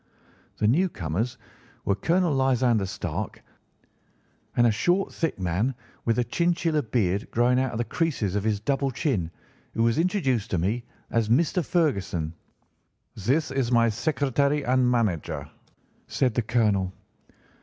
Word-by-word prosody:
"The 105 - +2
newcomers 115 - 0 0.5
were 100 - +3
Colonel 170 - +1
Lysander 125 -6 +2
Stark 95 - -5 1.1
and 120 - +5
a 115 - +5
short 175 - +1
thick 165 -2 -1
man 95 +8 0 0.3
with 115 0 +2
a 125 - +3
chinchilla 170 - +1
beard 105 -5 0
growing 125 +2 +3
out 130 -1 -1
of - - -3
the 120 - +1
creases 130 - -1
of 105 - 0
his 105 -2 0
double 140 +4 0
chin, 115 - -1 0.5
who 115 - +2
was 115 +5 +2
introduced 155 - +1
to 90 - 0
me 105 +8 -1 0.3
as 115 -2 +1
Mr. 165 +8 +2
Ferguson. 100 - 0 0.8
"'This 135 - 0
is 135 -3 0
my 115 -1 +4
secretary 140 +3 0
and 125 0 +3
manager,' 110 -10 -1 0.6
said 125 -4 +1
the 120 - +1
colonel. 105 -5 +1
120 Hz, 140 wpm, -26 LUFS, 105-140 Hz, 1.1 s, and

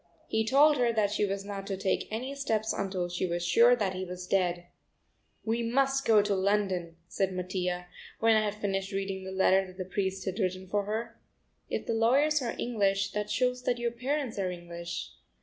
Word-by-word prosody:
He 220 0 +1
told 285 +6 +5
her 240 -2 +3
that 215 -3 +1
she 210 0 +1
was 195 0 -3
not 200 -1 -6
to 195 - -2
take 195 0 0
any 250 +5 -3
steps 225 -6 -1
until 190 -2 -2
she 175 +1 -2
was 175 0 -2
sure 235 +8 +6
that 205 -5 -1
he 185 0 -4
was 180 0 -6
dead. 180 -2 0 0.8
"We 230 +1 0
must 270 +3 +1
go 215 -2 +6
to 205 0 0
London," 190 -3 0
said 190 +1 -1
Mattia, 180 -1 -2 0.3
when 225 0 +5
I 215 - +4
had 210 -1 -1
finished 195 -2 -2
reading 195 -1 -3
the 190 - -5
letter 190 0 +3
that 185 0 -13
the 185 - -4
priest 190 0 -2
had 190 +2 -3
written 185 -1 -1
for 205 +1 0
her. 220 +3 -4 0.5
"If - - -3
the 230 - -1
lawyers 275 +7 +3
are 235 -2 -3
English, 200 -4 0
that 210 0 -3
shows 250 +1 +1
that 245 - +1
your 240 0 -1
parents 255 -1 -2
are 190 -2 0
English." 170 -1 -6
200 Hz, 200 wpm, -29 LUFS, 185-230 Hz, 0.8 s, sure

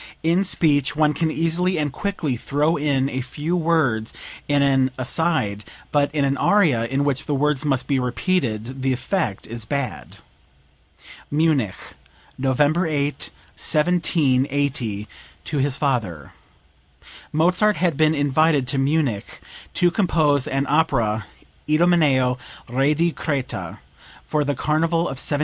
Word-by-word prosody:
In 170 +4 +2
speech 145 -7 +1
one 150 0 +3
can 160 +3 0
easily 165 +3 0
and 150 -3 -1
quickly 175 -9 -2
throw 145 +7 0
in 140 -2 0
a 130 -1 -3
few 145 +7 -3
words 155 -10 +1 0.3
in 145 -1 +2
an 135 -1 +3
aside; 130 -6 0 0.3
but 145 -1 +2
in 145 -2 +2
an 140 0 0
aria, 155 - +3
in 135 +3 0
which 140 0 -1
the 145 - 0
words 150 0 +1
must 135 -4 0
be 140 -2 0
repeated, 125 - -2
the 130 0 +1
effect 125 - -2
is 115 0 -6
bad." 130 0 -4 1.1
(Munich, 145 - +1 0.6
November 145 +6 +1
8, 145 -2 -1 0.3
1780, 140 - 0 0.4
to 150 - -3
his 135 0 +1
father. 110 - -2 1.0
Mozart 180 +7 +3
had 175 -3 0
been 155 +1 +3
invited 145 0 +2
to 135 - 0
Munich 135 -6 -1 0.4
to 175 0 +3
compose 155 - +2
an 135 +1 -1
opera, 120 -9 +1 0.4
"Idomeneo, 150 -6 +3 0.3
Re 135 +5 +1
di 170 +2 +1
Creta," 140 -5 -4 0.5
for 150 -1 0
the 145 0 -1
carnival 160 +4 +1
of 135 -6 -3
1781. 145 - 0
145 Hz, 130 wpm, -22 LUFS, 130-160 Hz, 1.1 s, one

